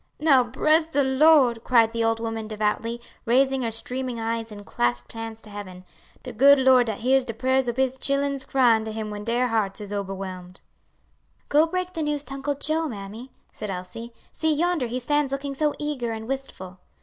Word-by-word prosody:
"Now 280 -5 +5
bress 310 +7 +2
de 290 -3 +1
Lord!" 265 -4 +4
cried 230 -3 +4
the 230 0 -1
old 225 0 +1
woman 225 -1 -4
devoutly, 215 +2 -2 0.3
raising 265 +3 +3
her 235 - -1
streaming 250 +2 -4
eyes 225 0 -3
and 205 -1 -10
clasped 120 -4 -2
hands 225 -1 -7
to 210 - -13
heaven; 185 -3 -9 0.4
"de - - -7
good 280 +5 +6
Lord 260 -2 +5
dat 220 -2 -4
hears 265 +2 +3
de 230 -3 -6
prayers 260 +1 +1
ob 240 - -4
His 265 0 +1
chilen's 275 0 0
cryin' 240 -5 +3
to 220 - -4
Him 215 -1 -5
when 205 0 -6
dere 240 +3 0
hearts 215 -3 -1
is 205 -1 -7
oberwhelmed!" 190 -2 -6 0.9
"Go 305 +3 +4
break 365 +1 -3
the 325 - -3
news 295 -1 0
to 275 - -7
Uncle 280 +1 -2
Joe, 315 +3 0
mammy," 220 +2 -8 0.2
said 210 - -6
Elsie; 195 +6 -7 0.2
"see, 315 -1 0
yonder 320 -3 +1
he 240 +2 -3
stands 290 +2 0
looking 275 0 -3
so 300 +2 0
eager 270 -6 -3
and 220 0 -7
wistful." 215 -9 -6
240 Hz, 195 wpm, -24 LUFS, 220-275 Hz, 0.9 s, good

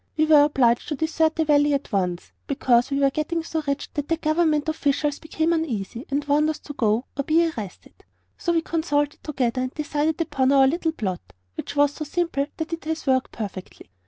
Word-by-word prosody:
We 310 - +4
were 300 -2 +7
obliged 245 -5 +2
to 300 - -2
desert 320 +1 +1
the 320 - +1
valley 290 -1 +4
at 275 - -5
once, 180 -3 -1 0.2
because 250 -3 +2
we 275 - -1
were 275 -1 +3
getting 320 +3 -2
so 320 -1 -3
rich 280 +1 -1
that 290 -1 -3
the 330 - +1
government 310 -1 +1
officials 290 -1 0
became 320 +1 -1
uneasy 240 - -3
and 285 +1 -1
warned 295 +2 +2
us 315 - -2
to 290 - -8
go 225 -1 +1
or 280 - -1
be 330 +4 +3
arrested. 210 - -9 0.3
So 345 - -1
we 330 -1 +1
consulted 295 -3 -1
together 255 -4 -1
and 255 0 -2
decided 300 +1 -1
upon 270 -5 +1
our 270 -1 +6
little 320 +4 +1
plot, 190 - -3 0.3
which 190 - -6
was 290 0 +3
so 305 - -5
simple 300 -2 -1
that 320 +1 -4
it 330 - -5
has 320 0 -3
worked 260 -2 +1
perfectly. 195 - -8
290 Hz, 205 wpm, -24 LUFS, 265-315 Hz, 0.3 s, were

